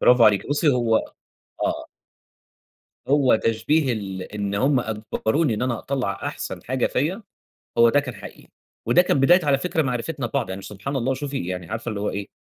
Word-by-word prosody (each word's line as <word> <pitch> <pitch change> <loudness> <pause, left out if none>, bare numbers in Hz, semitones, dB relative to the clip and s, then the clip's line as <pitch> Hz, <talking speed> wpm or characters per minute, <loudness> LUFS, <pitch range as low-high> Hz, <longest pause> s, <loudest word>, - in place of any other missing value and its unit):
برافو 125 -2 +6
عليكِ، 105 -2 +4
بُصّي 145 +2 +2
هو 120 -4 +3 0.7
آه. - - -2 1.2
هو 140 -4 +4
تشبيه 125 +6 +1
ال 95 -4 -4
إن 100 0 -4
هُم 130 +4 +2
أجبروني 110 +5 -1
إن 105 - -3
أنا 120 -3 0
أطلّع 130 -7 -2
أحسن - - -5
حاجة 130 0 0
فيَّ، 165 - -1 0.6
هو 115 0 +7
ده 145 +5 +4
كان 130 -4 -7
حقيقي، - - -12 0.4
وده 120 +10 +5
كان 140 -6 +1
بداية 175 +4 +5
على 140 -2 +3
فكرة 160 +1 0
معرفتنا 130 +1 -2
ببعض، 125 -3 -2
يعني 95 +1 -5
ش - - -8
سبحان 120 +8 -5
الله 130 +1 0
وشوفي 135 -6 -3
يعني 90 0 -5
عارفة 115 +2 -4
اللي 105 -2 -3
هو 105 - -1
إيه، 100 0 -5
125 Hz, 185 wpm, -23 LUFS, 110-140 Hz, 1.2 s, هو